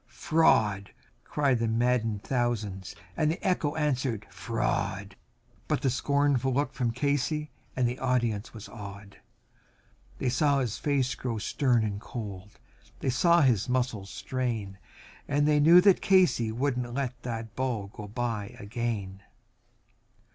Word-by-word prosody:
"Fraud!" 105 -11 +2 0.5
yelled 140 -5 +3
the 115 - 0
maddened 115 -2 +1
thousands, 110 -7 -2 0.2
and 155 - +2
the 165 +5 -2
echo 155 -5 +1
answered 130 -8 -1
"Fraud," 100 -4 -2 0.5
But - - 0
one 130 - +2
scornful 140 0 +1
look 140 +3 0
from 125 -3 0
Casey 145 +4 -1 0.2
and 125 -2 +2
the 125 +2 -3
audience 120 -5 0
was 110 -3 -10
awed; 100 -2 -10 1.0
They - - -2
saw 140 +3 +2
his 125 -5 -2
face 135 -3 +1
grow 120 -2 -3
stern 120 +2 +1
and 105 -1 -3
cold; 105 -5 -7 0.4
they 130 - -1
saw 170 +6 +4
his 125 -5 +2
muscles 120 -6 -1
strain, 115 -7 -3 0.5
And 145 +1 +2
they 150 -1 +4
knew 165 +4 +8
that 195 -1 +5
Casey 180 - +3
would 125 +3 -1
not 120 -1 -4
let 130 -3 -3
that 115 -2 -5
ball 125 -6 -1
go 105 - -8
by 115 0 -3
again. 100 -3 -4
120 Hz, 140 wpm, -28 LUFS, 105-140 Hz, 1.0 s, knew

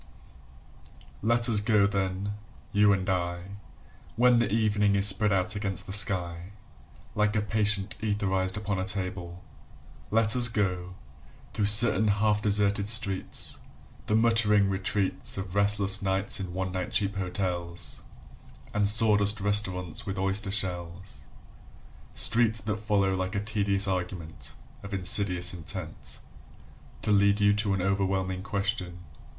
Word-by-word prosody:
LET 115 +2 +2
us 110 -3 +3
go 105 -2 +2
then, 100 0 -3 0.4
you 105 -1 +4
and 95 -2 -1
I, 90 +1 -4 0.6
When 120 0 +3
the 115 -4 -1
evening 105 -2 +1
is 100 0 +2
spread 105 +2 +3
out 95 +1 0
against 100 -2 -3
the 95 - -6
sky 90 -2 +3 0.6
Like 105 0 0
a 105 - +1
patient 105 0 -1
etherised 95 -3 -2
upon 100 -2 -3
a - - -2
table; 90 -3 -3 0.7
Let 110 0 +3
us 120 -1 +7
go, 90 -5 -3 0.6
through 105 - -1
certain 105 0 +6
half 105 0 +1
deserted 100 0 +2
streets, 100 -4 -1 0.5
The 105 - 0
muttering 110 -3 +2
retreats 95 +1 -1
Of 95 -2 -6
restless 100 0 +3
nights 95 +1 -1
in 95 -2 -6
one 95 0 -3
night 90 0 -5
cheap 100 -3 0
hotels 90 -2 -3 0.7
And 105 -1 +1
sawdust 105 -1 +4
restaurants 95 -3 -1
with 95 0 -4
oyster 95 +1 0
shells: 90 -1 -4 0.9
Streets 115 -1 +2
that 105 +1 -3
follow 100 -2 0
like 95 +2 -4
a - - 0
tedious 100 -1 0
argument 90 -3 -5 0.3
Of 100 0 -7
insidious 90 -1 +2
intent 85 -3 -6 0.9
To - - 0
lead 100 0 +3
you 100 0 +3
to 105 -1 -1
an 95 - -3
overwhelming 95 -1 -2
question. 95 -3 -3
100 Hz, 135 wpm, -26 LUFS, 95-105 Hz, 0.9 s, us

